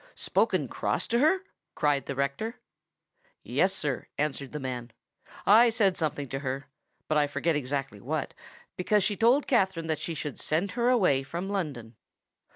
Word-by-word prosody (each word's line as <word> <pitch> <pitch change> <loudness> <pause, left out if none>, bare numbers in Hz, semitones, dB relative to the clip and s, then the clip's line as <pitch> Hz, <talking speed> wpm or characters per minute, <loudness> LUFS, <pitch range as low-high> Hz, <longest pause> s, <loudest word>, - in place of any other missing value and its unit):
"Spoken - - +1
cross - - -1
to 235 - +2
her!" 325 +7 +3 0.3
cried 145 -2 +1
the 140 - -3
rector. 140 - -2 0.8
"Yes, 190 - +2
sir," 145 -8 -3
answered 140 -2 -2
the 150 - -4
man; 125 -3 -4 0.6
"I 230 +4 +7
said 210 -5 +2
something 150 -4 -2
to 135 - -3
her—but 140 +3 -4
I 145 - +3
forget 160 +3 0
exactly 135 -6 -3
what—because 200 - -2
she 205 +2 +1
told 240 +7 +4
Katherine 190 -9 +1
that 155 -2 -1
she 165 - -4
should 150 -2 -5
send 170 +6 0
her 240 0 +1
away 185 - +4
from 170 +8 -5
London." 135 - -4
155 Hz, 155 wpm, -28 LUFS, 140-200 Hz, 0.8 s, I